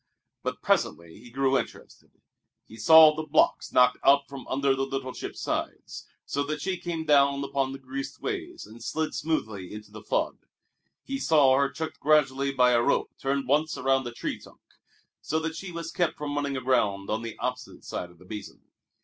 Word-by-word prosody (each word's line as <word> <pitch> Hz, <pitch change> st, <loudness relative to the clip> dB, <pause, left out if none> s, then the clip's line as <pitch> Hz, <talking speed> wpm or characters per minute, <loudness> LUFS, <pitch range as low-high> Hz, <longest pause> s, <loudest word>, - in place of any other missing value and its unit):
But -, -, -4 dB
presently 85 Hz, +2 st, 0 dB
he 120 Hz, +2 st, -14 dB
grew 135 Hz, +2 st, +2 dB
interested. -, -, -9 dB, 0.6 s
He 110 Hz, -, -14 dB
saw 155 Hz, +7 st, +8 dB
the 155 Hz, -, -2 dB
blocks 155 Hz, 0 st, +2 dB
knocked 125 Hz, 0 st, +4 dB
out 140 Hz, 0 st, +5 dB
from 135 Hz, -3 st, -9 dB
under 135 Hz, +1 st, +1 dB
the 135 Hz, 0 st, -1 dB
little 135 Hz, -1 st, -4 dB
ship's -, -, -7 dB
sides, -, -, -4 dB, 0.2 s
so 140 Hz, -, -2 dB
that 150 Hz, +1 st, -3 dB
she 185 Hz, +4 st, -2 dB
came 170 Hz, -2 st, -4 dB
down 140 Hz, -2 st, +4 dB
upon 135 Hz, -1 st, -1 dB
the 135 Hz, -, -6 dB
greased 135 Hz, +1 st, -6 dB
ways 355 Hz, -4 st, -5 dB
and 115 Hz, +1 st, -13 dB
slid 160 Hz, +3 st, -2 dB
smoothly 110 Hz, -, -3 dB
into 105 Hz, 0 st, -10 dB
the -, -, -10 dB
flood. -, -, -1 dB, 0.6 s
He 275 Hz, 0 st, -4 dB
saw 145 Hz, -, +5 dB
her 140 Hz, 0 st, +2 dB
checked 160 Hz, +4 st, -6 dB
gradually 140 Hz, -2 st, +2 dB
by 125 Hz, -2 st, +4 dB
a 120 Hz, -1 st, +4 dB
rope -, -, +1 dB
turned 135 Hz, -1 st, -1 dB
once 150 Hz, +3 st, +1 dB
around 135 Hz, -1 st, +1 dB
a -, -, -5 dB
tree 120 Hz, -, -4 dB
trunk, -, -, -17 dB, 0.6 s
so 155 Hz, -, -1 dB
that 160 Hz, 0 st, -2 dB
she 190 Hz, +1 st, -7 dB
was 165 Hz, -1 st, -6 dB
kept 175 Hz, -2 st, 0 dB
from 145 Hz, -1 st, -4 dB
running 140 Hz, -2 st, -1 dB
aground 105 Hz, -7 st, 0 dB
on 110 Hz, +1 st, -1 dB
the 115 Hz, -1 st, -7 dB
opposite 125 Hz, 0 st, -5 dB
side 90 Hz, -, -5 dB
of 90 Hz, -, -19 dB
the 90 Hz, -, -17 dB
Basin. 105 Hz, +2 st, -9 dB
135 Hz, 190 wpm, -27 LUFS, 125-155 Hz, 0.6 s, saw